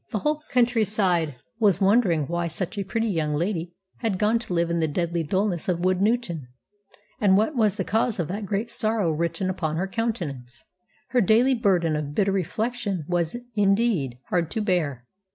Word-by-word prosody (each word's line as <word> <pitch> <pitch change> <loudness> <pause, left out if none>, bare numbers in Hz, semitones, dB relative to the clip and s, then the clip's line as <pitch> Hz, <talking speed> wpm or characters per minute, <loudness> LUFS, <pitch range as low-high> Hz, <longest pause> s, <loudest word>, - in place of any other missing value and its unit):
The 225 - -2
whole 300 +7 -1
country 245 -3 +3
side 180 - +1 0.2
was 200 -5 +3
wondering 195 -6 +3
why 170 +3 -2
such 170 +4 -4
a 200 - -2
pretty 225 +4 -1
young 155 -5 0
lady 170 +1 -2 0.2
had 220 -5 -1
gone 215 +3 +2
to 230 -6 -6
live 170 0 +1
in 170 - 0
the 160 - +1
deadly 170 +2 -1
dullness 185 +2 -1
of 175 -1 0
Woodnewton, 185 - 0 0.7
and 195 -2 +4
what 220 +9 +1
was 215 -4 +2
the 195 - -2
cause 225 +3 0
of 170 -5 -1
that 200 +2 -4
great 210 +3 -2
sorrow 215 -6 +1
written 170 +4 -1
upon 160 -4 -2
her 190 +3 -1
countenance. 175 - -4 0.4
Her 250 - +3
daily 230 +6 +4
burden 185 -9 +2
of 150 -1 -4
bitter 200 -1 +2
reflection 200 0 -2
was, 175 0 0 0.2
indeed, 200 - +1
hard 170 -3 0
to 220 - -2
bear. 155 - -1
190 Hz, 180 wpm, -25 LUFS, 170-220 Hz, 0.7 s, and